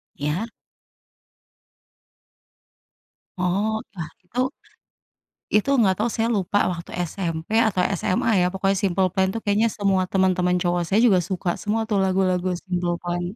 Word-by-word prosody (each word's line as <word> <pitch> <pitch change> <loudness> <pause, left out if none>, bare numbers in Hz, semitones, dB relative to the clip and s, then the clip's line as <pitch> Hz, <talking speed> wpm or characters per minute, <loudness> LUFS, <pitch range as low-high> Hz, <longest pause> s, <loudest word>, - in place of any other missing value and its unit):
Iya. 150 +10 -2 2.9
Oh, 205 +5 0
lah 160 -4 -5
itu 250 +8 -1 1.1
itu 215 +6 +3
nggak 190 -5 +4
tahu 240 - +1
saya 225 +1 0
lupa 205 -3 +1
waktu 170 0 -7 0.2
SMP 165 +3 -3
atau 190 -4 -1 0.2
SMA 185 +5 0
ya - - +3
pokoknya 195 +1 0
Simple 190 -1 +2
Plan 190 -1 +2
tuh 225 - -3
kayaknya 215 +3 +2
semua 195 -2 +1
teman-teman 185 -1 +2
cowok 175 0 0
saya 190 +6 +1
juga 215 -6 +5
suka 180 0 -3
semua 220 +2 -1
tuh 210 - +1
lagu-lagu 185 -1 +1
Simple 175 -2 -1
Plan. 175 0 -3
190 Hz, 135 wpm, -23 LUFS, 180-205 Hz, 2.9 s, juga